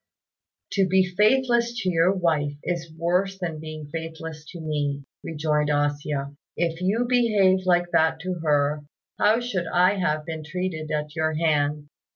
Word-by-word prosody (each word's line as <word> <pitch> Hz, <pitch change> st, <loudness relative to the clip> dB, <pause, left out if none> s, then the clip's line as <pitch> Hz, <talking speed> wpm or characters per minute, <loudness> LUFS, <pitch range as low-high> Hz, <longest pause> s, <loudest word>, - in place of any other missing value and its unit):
"To 195 Hz, -3 st, +2 dB
be 190 Hz, +1 st, +4 dB
faithless 235 Hz, +5 st, +2 dB
to 185 Hz, -, +1 dB
your 170 Hz, +2 st, +4 dB
wife 160 Hz, -6 st, 0 dB
is 170 Hz, -2 st, -3 dB
worse 180 Hz, +4 st, 0 dB
than 170 Hz, -4 st, -4 dB
being 155 Hz, -1 st, -7 dB
faithless 160 Hz, 0 st, -7 dB
to 175 Hz, -, -9 dB
me," 145 Hz, -3 st, -2 dB, 0.2 s
rejoined 150 Hz, -1 st, 0 dB
A 145 Hz, 0 st, +2 dB
hsia; 145 Hz, -1 st, -4 dB, 0.2 s
"if 165 Hz, 0 st, -1 dB
you 210 Hz, +6 st, +1 dB
behaved 205 Hz, -7 st, +3 dB
like 175 Hz, -1 st, +3 dB
that 160 Hz, 0 st, +3 dB
to 185 Hz, +2 st, -2 dB
her, 150 Hz, -1 st, +2 dB, 0.4 s
how 215 Hz, +3 st, +4 dB
should 200 Hz, -8 st, -2 dB
I 180 Hz, +4 st, +3 dB
have 155 Hz, -4 st, 0 dB
been 160 Hz, -2 st, -5 dB
treated 160 Hz, -1 st, -4 dB
at 150 Hz, 0 st, -3 dB
your 160 Hz, 0 st, 0 dB
hands? 150 Hz, -2 st, +1 dB
165 Hz, 160 wpm, -25 LUFS, 150-185 Hz, 0.4 s, be